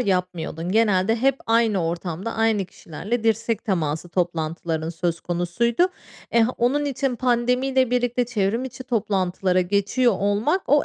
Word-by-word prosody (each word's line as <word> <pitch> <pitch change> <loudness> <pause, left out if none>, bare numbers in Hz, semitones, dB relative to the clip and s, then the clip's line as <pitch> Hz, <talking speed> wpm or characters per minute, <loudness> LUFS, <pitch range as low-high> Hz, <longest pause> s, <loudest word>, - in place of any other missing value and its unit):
yapmıyordun. 180 -4 -2
Genelde 215 -1 +3
hep 270 +3 +2
aynı 225 -5 +2
ortamda 175 +5 -3
aynı 225 -3 +2
kişilerle 205 +7 -5
dirsek 225 0 0
teması 170 -5 -1
toplantıların 165 -2 -2
söz 170 0 -2
konusuydu. 225 - +1 0.4
Eh, 230 -1 +4
onun 270 +5 +2
için 270 -2 -1
pandemiyle 255 +1 +1
birlikte 245 0 +1
çevrimiçi 235 +3 -2
toplantılara 190 -5 0
geçiyor 205 +6 +2
olmak, 210 - +1
o 290 +1 +4
215 Hz, 120 wpm, -23 LUFS, 180-245 Hz, 0.4 s, Eh